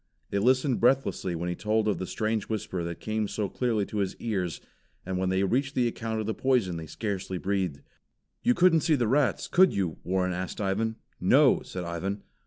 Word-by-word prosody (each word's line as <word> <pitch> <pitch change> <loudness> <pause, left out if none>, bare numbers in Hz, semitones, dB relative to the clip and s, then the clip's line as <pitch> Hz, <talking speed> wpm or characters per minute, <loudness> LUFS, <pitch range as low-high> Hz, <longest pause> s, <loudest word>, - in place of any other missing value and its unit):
They 100 - +1
listened 130 +3 +2
breathlessly 115 -8 +2
when 85 +2 -3
he 90 - -1
told 110 +3 0
of 105 - +1
the 95 - -4
strange 110 -1 -2
whisper 95 -5 -3
that 85 0 -5
came 110 -1 -1
so 105 0 -2
clearly 110 -1 0
to 105 - -6
his 95 -2 -1
ears, 95 -7 -2 0.5
and 95 0 -2
when 95 0 0
they 95 +1 +1
reached 135 +7 0
the 125 -1 +3
account 115 -1 -3
of 110 - -2
the 110 - -1
poison 120 -10 +1
they 80 -1 -7
scarcely 95 -1 -3
breathed. 95 -6 -1 0.6
"You 245 +1 +3
couldn't 175 -4 +5
see 160 0 +3
the 120 -5 +1
rats, 135 +3 +2
could 185 +1 +4
you?" 90 -5 -1
Warren 90 0 0
asked 90 +1 -4
Ivan. 105 +3 0 0.2
"No!" - - +5
said 90 - -6
Ivan. 90 +4 -3
105 Hz, 200 wpm, -28 LUFS, 95-120 Hz, 0.6 s, couldn't